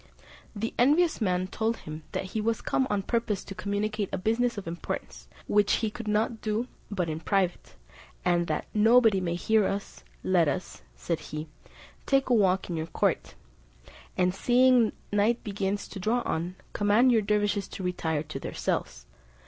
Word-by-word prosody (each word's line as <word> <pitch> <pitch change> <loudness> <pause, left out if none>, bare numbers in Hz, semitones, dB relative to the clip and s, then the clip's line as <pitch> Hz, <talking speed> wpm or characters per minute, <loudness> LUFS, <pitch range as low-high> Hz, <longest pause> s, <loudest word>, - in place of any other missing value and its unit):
The 225 +2 -3
envious 300 +5 +4
man 185 -3 +1
told 220 +4 -1
him 155 +1 -8
that - - -1
he 220 - 0
was 225 +1 -1
come 265 - +1
on 200 -1 0
purpose 220 -3 -1
to 195 - -8
communicate 205 +1 -2
a - - -1
business 230 +5 0
of 195 - -6
importance, 170 +1 -5 0.2
which 205 -1 +3
he 220 -2 0
could 230 0 -8
not 215 +2 0
do 220 +3 -1 0.2
but 185 -4 -1
in 155 0 -3
private; 185 +1 -1 0.5
and 175 -1 +2
"that - - -1
nobody 225 -2 +5
may 170 -1 -1
hear 215 +3 +2
us, 200 0 -5 0.2
let 180 -4 +3
us," - - -3
said 160 - -2
he, 150 0 -6 0.6
"take 275 -1 +2
a - - +4
walk 190 -4 +3
in 175 - -3
your 160 0 -3
court; - - -1 0.8
and 180 0 +2
seeing 245 +2 +4 0.2
night 210 +4 +2
begins 200 -1 -2
to 195 - -7
draw 230 +6 +1
on, 175 +3 -2 0.2
command 210 +5 +4
your 225 -2 +4
dervises 205 -1 0
to 190 - -7
retire 160 -4 -1
to 150 -3 -6
their - - -6
cells." - - -2
205 Hz, 175 wpm, -28 LUFS, 180-225 Hz, 0.8 s, nobody